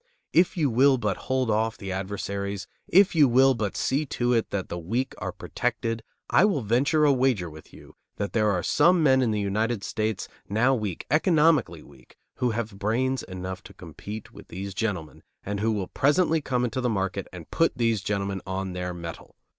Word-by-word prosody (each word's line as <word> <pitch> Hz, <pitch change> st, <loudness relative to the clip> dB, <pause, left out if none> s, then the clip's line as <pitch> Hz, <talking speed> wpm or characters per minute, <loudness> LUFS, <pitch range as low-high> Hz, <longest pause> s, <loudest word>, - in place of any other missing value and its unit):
If 175 Hz, +2 st, +3 dB
you 145 Hz, -6 st, +2 dB
will 130 Hz, +3 st, +5 dB
but 105 Hz, -6 st, -1 dB
hold 130 Hz, -3 st, +1 dB
off 110 Hz, +1 st, 0 dB
the 95 Hz, -2 st, -6 dB
adversaries, 100 Hz, 0 st, -4 dB, 0.2 s
if 190 Hz, +2 st, +5 dB
you 155 Hz, -4 st, +6 dB
will 130 Hz, +2 st, +5 dB
but 110 Hz, -5 st, -3 dB
see 140 Hz, +3 st, +1 dB
to 120 Hz, -1 st, 0 dB
it 115 Hz, -2 st, +1 dB
that 95 Hz, -2 st, -3 dB
the 85 Hz, -, -5 dB
weak 120 Hz, +10 st, -2 dB
are -, -, -3 dB
protected, 115 Hz, 0 st, -3 dB, 0.3 s
I -, -, +4 dB
will 200 Hz, -9 st, +2 dB
venture 140 Hz, +8 st, +2 dB
a 145 Hz, -, +5 dB
wager 125 Hz, -10 st, +1 dB
with 80 Hz, +1 st, -13 dB
you -, -, -15 dB, 0.2 s
that 100 Hz, -1 st, -4 dB
there 105 Hz, -2 st, +2 dB
are 90 Hz, -4 st, 0 dB
some 175 Hz, -, +4 dB
men 130 Hz, -3 st, +5 dB
in 125 Hz, -, +2 dB
the 105 Hz, -1 st, 0 dB
United 105 Hz, +2 st, -1 dB
States, 110 Hz, -1 st, -2 dB, 0.2 s
now 115 Hz, +6 st, +3 dB
weak, 105 Hz, -8 st, -3 dB
economically 150 Hz, -, +3 dB
weak, 70 Hz, -2 st, -19 dB, 0.2 s
who 125 Hz, -, +1 dB
have 110 Hz, -3 st, -4 dB
brains 125 Hz, +6 st, 0 dB
enough 95 Hz, 0 st, -6 dB
to -, -, -14 dB
compete 105 Hz, +1 st, -9 dB
with -, -, -13 dB
these 95 Hz, +2 st, -6 dB
gentlemen 95 Hz, -7 st, -3 dB, 0.2 s
and 100 Hz, 0 st, -3 dB
who 110 Hz, +2 st, +1 dB
will 100 Hz, -4 st, -2 dB
presently 160 Hz, +3 st, +2 dB
come 125 Hz, -3 st, -1 dB
into 125 Hz, +2 st, -2 dB
the 125 Hz, -, +1 dB
market 95 Hz, -2 st, -2 dB
and 90 Hz, -3 st, -11 dB
put 165 Hz, -5 st, +1 dB
these 115 Hz, -4 st, +1 dB
gentlemen 100 Hz, -1 st, -2 dB
on 95 Hz, 0 st, -3 dB
their 90 Hz, 0 st, -4 dB
mettle. 85 Hz, -1 st, -8 dB
110 Hz, 195 wpm, -26 LUFS, 100-130 Hz, 0.3 s, you